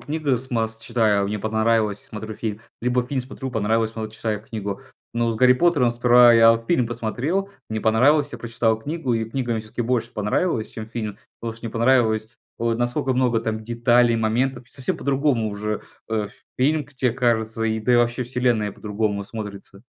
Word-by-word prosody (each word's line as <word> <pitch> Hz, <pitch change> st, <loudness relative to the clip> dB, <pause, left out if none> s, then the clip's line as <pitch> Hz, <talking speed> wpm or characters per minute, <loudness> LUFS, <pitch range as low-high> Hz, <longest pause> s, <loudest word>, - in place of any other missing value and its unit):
книга 145 Hz, -2 st, -1 dB
с 130 Hz, +2 st, -10 dB
масс 110 Hz, -2 st, -1 dB
читаю, 110 Hz, -4 st, +1 dB
не 105 Hz, -, -2 dB
понравилось- 110 Hz, -1 st, +1 dB
смотрю 110 Hz, 0 st, -7 dB
фильм, 110 Hz, -1 st, -4 dB, 0.2 s
либо 125 Hz, +1 st, +1 dB
фильм 130 Hz, -1 st, -1 dB
смотрю- 130 Hz, +1 st, -7 dB
понравилось, 110 Hz, 0 st, 0 dB
потом 110 Hz, -1 st, -5 dB
читаю 110 Hz, -1 st, -3 dB
книгу. 105 Hz, -3 st, -5 dB, 0.3 s
Но 120 Hz, 0 st, +1 dB
с 115 Hz, -, -2 dB
"Гарри 125 Hz, +2 st, +6 dB
Поттером" 145 Hz, -3 st, +3 dB
сперва 120 Hz, 0 st, +6 dB
я 115 Hz, 0 st, +7 dB
вот 115 Hz, 0 st, -3 dB
фильм 130 Hz, -9 st, +2 dB
посмотрел, 125 Hz, -, -2 dB, 0.2 s
мне 110 Hz, 0 st, -3 dB
понравилось- 140 Hz, +7 st, +3 dB
я 120 Hz, -, -6 dB
прочитал 115 Hz, -1 st, 0 dB
книгу, 145 Hz, +1 st, -3 dB
и 115 Hz, -1 st, 0 dB
книга 120 Hz, -1 st, -2 dB
мне 110 Hz, -, -1 dB
всё-таки 110 Hz, +2 st, -5 dB
больше 120 Hz, -1 st, -1 dB
понравилась, 110 Hz, -, 0 dB
чем 110 Hz, -1 st, -7 dB
фильм, 110 Hz, -3 st, -5 dB, 0.2 s
потому 115 Hz, -1 st, -4 dB
что 115 Hz, +1 st, -8 dB
мне 115 Hz, -, -5 dB
понравилось 115 Hz, -2 st, +3 dB, 0.3 s
вот 115 Hz, 0 st, -1 dB
насколько 120 Hz, +2 st, 0 dB
много 125 Hz, -3 st, +2 dB
там 110 Hz, -1 st, -3 dB
деталей, 120 Hz, +1 st, +3 dB
моментов. 120 Hz, +3 st, 0 dB
Совсем 130 Hz, -2 st, -3 dB
по-другому 135 Hz, -5 st, +1 dB
уже, 105 Hz, +1 st, -3 dB, 0.3 s
э, 110 Hz, -2 st, -1 dB, 0.3 s
фильм 150 Hz, +3 st, +2 dB
к 150 Hz, -, -19 dB
тебе 130 Hz, -1 st, +1 dB
кажется, 115 Hz, -2 st, 0 dB
да -, -, +2 dB
и 110 Hz, +2 st, +2 dB
вообще 120 Hz, +1 st, +2 dB
вселенная 120 Hz, -4 st, 0 dB
по-другому 105 Hz, -1 st, -2 dB
смотрится. 100 Hz, -1 st, -8 dB
115 Hz, 185 wpm, -23 LUFS, 110-125 Hz, 0.3 s, я